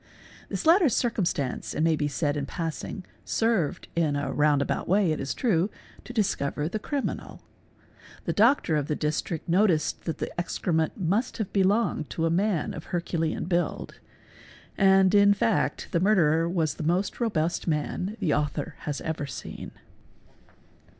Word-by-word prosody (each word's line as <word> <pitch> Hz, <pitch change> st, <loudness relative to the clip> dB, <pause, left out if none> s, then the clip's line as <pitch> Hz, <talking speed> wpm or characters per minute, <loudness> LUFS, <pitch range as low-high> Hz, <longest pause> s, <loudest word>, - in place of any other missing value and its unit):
This -, -, -4 dB
latter 335 Hz, -1 st, +6 dB
circum 230 Hz, -5 st, 0 dB
z -, -, +3 dB
stance, 140 Hz, -6 st, -3 dB
it -, -, -1 dB
may 165 Hz, 0 st, +3 dB
be 150 Hz, -1 st, -1 dB
said 145 Hz, +1 st, -1 dB
in 145 Hz, -1 st, -3 dB
passing, 165 Hz, +4 st, -5 dB, 0.2 s
served, 225 Hz, -10 st, 0 dB
in 160 Hz, -4 st, +1 dB
a 140 Hz, -1 st, -2 dB
round 150 Hz, 0 st, +3 dB
about -, -, -3 dB
way 190 Hz, -2 st, +3 dB
it 155 Hz, -, -1 dB
is 135 Hz, -, -3 dB
true, 195 Hz, -6 st, +1 dB, 0.4 s
to -, -, -8 dB
discover 170 Hz, -, -1 dB
the 215 Hz, +6 st, -3 dB
criminal; 280 Hz, +4 st, -4 dB, 0.8 s
the -, -, 0 dB
doctor 225 Hz, -, +3 dB
of 150 Hz, -2 st, 0 dB
the 150 Hz, -, 0 dB
district 155 Hz, +2 st, -2 dB
noticed 175 Hz, -2 st, +2 dB
that 165 Hz, -, -2 dB
the -, -, -5 dB
excrement 160 Hz, 0 st, -1 dB
must 195 Hz, +7 st, 0 dB
have 220 Hz, -5 st, -4 dB
belonged 195 Hz, -5 st, +1 dB
to 165 Hz, -, -1 dB
a 165 Hz, -, +1 dB
man 185 Hz, -2 st, 0 dB
of -, -, -8 dB
herculean 170 Hz, -2 st, -2 dB
build; 175 Hz, 0 st, -2 dB, 0.8 s
and 195 Hz, -1 st, +5 dB
in 200 Hz, 0 st, +6 dB
fact 220 Hz, +1 st, 0 dB
| -, -, -27 dB
the 170 Hz, -, +2 dB
murderer 170 Hz, -4 st, +3 dB
was 165 Hz, -4 st, 0 dB
the -, -, -6 dB
most 175 Hz, +5 st, 0 dB
robust 175 Hz, -10 st, -1 dB
man 175 Hz, +6 st, -2 dB
the 180 Hz, -8 st, +1 dB
author 150 Hz, +2 st, -1 dB
has 145 Hz, -1 st, -4 dB
ever 160 Hz, -3 st, -3 dB
seen. 125 Hz, -, -7 dB
170 Hz, 165 wpm, -27 LUFS, 155-205 Hz, 0.8 s, latter